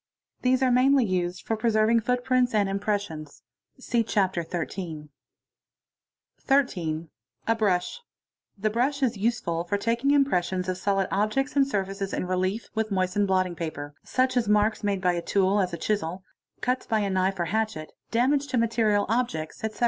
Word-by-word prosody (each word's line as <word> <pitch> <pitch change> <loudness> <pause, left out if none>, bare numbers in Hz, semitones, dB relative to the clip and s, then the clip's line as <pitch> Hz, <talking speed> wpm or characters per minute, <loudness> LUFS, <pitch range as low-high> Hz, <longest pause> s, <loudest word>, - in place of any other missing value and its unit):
These 255 +1 +2
are 255 - +3
mair 255 +2 +4
of - - +4
use 180 -1 -1
for 225 - -2
preserving 220 +1 +3
footprints 250 +1 +1
and 205 -2 +3
impressions 195 -7 -3 0.4
(see 240 -2 0
Chapter 190 -5 0
XII1.) 160 -2 -5 0.7
— - - -47
13. 170 - 0 0.4
A 225 - +3
brush. 205 - 0 0.6
The 215 +2 0
brush 270 +5 0
is 245 -3 +2
useful 195 -6 -1
for 190 +4 -1
taking 235 +6 0
impressions 185 -10 +2
of 185 0 -2
sol 195 0 +1
objects 215 +9 0
and 275 -1 +4
surfaces 195 -4 -3
in - - -1
relief, 185 +4 -1
with 220 -1 -1
moistened 190 +1 +1
blotting 185 -2 +1
paper; 145 -3 -5
such 255 0 0
marks 210 +1 +2
made 200 -2 0
by 180 -1 +2
a 170 - -2
tool, 195 +2 +2
as 185 -2 0
a 170 - -4
chisel, 190 -1 -2 0.4
cuts 255 +1 -1
by 220 -2 +1
a 200 - 0
knife 190 0 0
or 170 - +1
hatchet, 205 -4 -2 0.2
damage 275 +4 +1
material 225 -3 +2
objects, 215 -10 -2
ete. 220 -1 -4
205 Hz, 165 wpm, -26 LUFS, 185-235 Hz, 0.7 s, mair